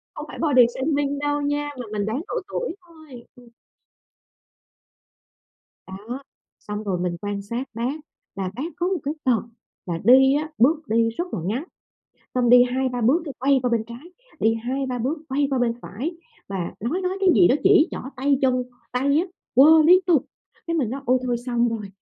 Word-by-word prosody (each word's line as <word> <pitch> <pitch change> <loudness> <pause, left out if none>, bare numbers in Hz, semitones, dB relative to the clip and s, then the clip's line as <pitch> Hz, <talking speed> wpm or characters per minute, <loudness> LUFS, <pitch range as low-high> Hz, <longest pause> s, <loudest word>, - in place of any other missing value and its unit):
Không - - -6
phải - - -9
body 285 -6 +5
shaming 285 0 -1
đâu 290 0 -1
nha, 290 0 -1
mà 245 - -6
mình 205 -1 -2
đoán 230 +8 -2
độ - - -4
tuổi 440 -3 -4
thôi, 310 -8 -14
ừm. 245 -1 -17 2.4
Đó, 215 +8 -7 0.4
xong 210 0 -6
rồi 190 -3 -1
mình 175 -1 -2
quan 205 -1 -3
sát 235 +6 -4
bác 240 +6 -2 0.4
là 190 -2 -3
bác 275 +8 -4
có 350 - -1
một 370 -2 -1
cái 290 +2 -2
tật 245 -6 +2 0.4
là 170 -2 -2
đi 265 +2 +6
á, 305 +2 -2
bước 300 +4 +2
đi 230 +1 +2
rất 230 +10 -3
là - - -3
ngắn, 225 - -2 0.7
xong 245 -2 +2
đi 245 0 +8
2-3 250 0 -1
bước 265 +10 +3
cái 285 -4 -7
quay 275 +1 +3
qua 250 - 0
bên 230 -2 0
trái, 245 +10 -11 0.3
đi 225 +1 +3
2-3 250 +2 -3
bước 270 +7 -2
quay 280 +2 +1
qua 265 - 0
bên 245 -1 +1
phải 255 - -5 0.4
mà 190 -3 -4
nói 250 - -2
nói 365 +1 -1
cái 385 - +3
gì 350 - +6
đó, - - +4
chỉ 375 -4 +6
trỏ - - -5 0.2
tay 275 +1 +1
chân, 255 -1 +2 0.3
tay 280 +4 +2
á, 340 - +1 0.3
quơ 310 +5 +7
liên 360 +4 +7
tục. 325 -7 +3 0.4
Cái 335 - -1
mình 260 -9 0
nói: 270 +3 -4
"Ôi 255 +1 +3
thôi 245 -1 0
xong 240 -1 +1
rồi, 220 -3 -4
255 Hz, 195 wpm, -23 LUFS, 230-290 Hz, 2.4 s, đi